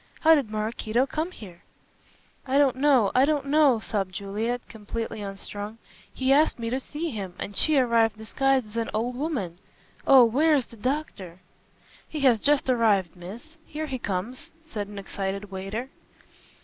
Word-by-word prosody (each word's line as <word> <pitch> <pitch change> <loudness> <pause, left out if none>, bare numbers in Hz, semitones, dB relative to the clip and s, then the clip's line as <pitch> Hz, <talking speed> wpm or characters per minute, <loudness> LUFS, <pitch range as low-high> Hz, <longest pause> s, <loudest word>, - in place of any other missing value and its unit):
How 320 - +7
did 280 -8 +2
Maraquito 215 +3 -1
come 315 +5 -3
here?" 190 - -12 0.9
"I 265 +2 +2
don't 275 -3 +4
know 265 -7 +4
I 255 - +5
don't 290 -1 +1
know," 285 -3 +4
sobbed 195 -4 -3
Juliet, 220 +5 -3
completely 220 0 -5
unstrung; 205 +2 -6 0.3
"he 265 +1 +2
asked 300 +3 +3
me 230 -1 -4
to 260 - 0
see 300 +4 -5
him, 195 -6 -6
and 200 - -6
she 310 -2 +3
arrived 230 -4 +3
disguised 265 +3 +1
as 210 +2 -9
an 230 -1 -1
old 240 +3 -1
woman. 245 - -3 0.5
Oh, 265 -3 +8
where 300 +7 +3
is 265 -4 +1
the - - -15
doctor!" 210 - -4 0.7
"He 305 - -4
has 250 -5 +5
just 285 +3 +2
arrived, 215 -8 +2
miss. 230 - -11
Here 310 0 -5
he 265 -4 -4
comes," 240 - -4 0.2
said 210 -9 -4
an 205 0 -10
excited 195 0 -4
waiter. 200 +7 -5
235 Hz, 165 wpm, -26 LUFS, 205-275 Hz, 0.9 s, Oh